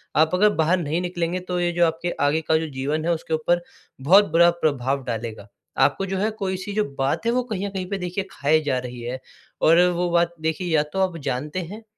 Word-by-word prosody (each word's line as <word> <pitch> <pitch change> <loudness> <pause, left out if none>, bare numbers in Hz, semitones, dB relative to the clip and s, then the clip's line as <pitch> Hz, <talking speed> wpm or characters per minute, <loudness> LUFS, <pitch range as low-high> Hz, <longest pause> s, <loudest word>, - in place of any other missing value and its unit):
आप 160 +3 +3
अगर 210 +3 +5
बाहर 170 +4 +3
नहीं 165 +2 -1
निकलेंगे 175 0 -2
तो 180 - 0
ये 175 0 +1
जो 175 0 +3
आपके 165 +2 -2 0.2
आगे 160 +3 +1
का 160 - +5
जो 160 0 -2
जीवन 155 +4 -1
है 170 - +2
उसके 160 0 -4
ऊपर 170 +3 +1 0.4
बहुत 190 +6 +5
बुरा 170 +1 +6
प्रभाव 135 -2 0
डालेगा। 115 -3 -5 0.4
आपको 195 - 0
जो 190 0 -3
है 210 +3 +1
कोई-सी 190 +1 -3
जो 215 - +1 0.2
बात 135 +11 0
है 235 - +3
वो 250 0 +1
कहीं 200 -1 -2
न - - -4
कहीं 190 -1 -4
पे 200 - -2
देखिए 180 +1 -3
खाए 155 0 +2
जा 130 -4 0
रही 125 0 -9
है। 125 +2 -4 0.4
और 165 +2 +6
वो 175 0 -1
बात 170 0 +2
देखिए 160 +3 -2
या 150 - +4
तो 190 - -1
आप 185 -3 0
जानते 150 +8 -3
हैं 220 - -10
170 Hz, 230 wpm, -23 LUFS, 150-185 Hz, 0.4 s, बुरा